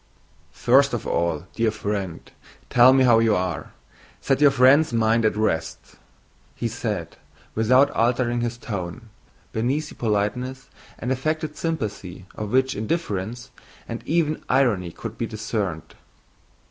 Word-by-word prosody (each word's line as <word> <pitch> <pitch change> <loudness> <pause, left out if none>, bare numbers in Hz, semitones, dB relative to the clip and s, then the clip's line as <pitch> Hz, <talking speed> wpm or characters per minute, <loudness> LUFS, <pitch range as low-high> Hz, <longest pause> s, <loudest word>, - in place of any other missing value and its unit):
"First 135 +2 +4
of 115 - -5
all, 85 -1 -1
dear 115 -1 +1
friend, 100 -5 -3 0.5
tell 125 +1 +7
me 130 0 +4
how 120 -3 +5
you 115 -2 +3
are. 90 -3 -3 0.5
Set 135 +1 0
your 145 - +8
friend's 135 +3 +5
mind 115 0 +2
at 110 - +2
rest," 80 -7 -2 0.6
said 110 -6 -3 0.3
he - - -28
without 130 +6 +4
altering 120 +1 +1
his 120 0 -2
tone, 105 0 -6 0.4
beneath 135 +7 -1
the - - -11
politeness 120 +5 -2 0.3
and 125 - -3
affected 155 +3 -2
sympathy 105 - -4
of 105 -1 -5
which 130 +1 +2
indifference 115 - -3 0.4
and 115 0 -5
even 155 -1 +1
irony 110 -10 +2
could 115 +5 -8
be 115 - -1
discerned. 105 -7 -4
115 Hz, 135 wpm, -23 LUFS, 105-130 Hz, 0.6 s, your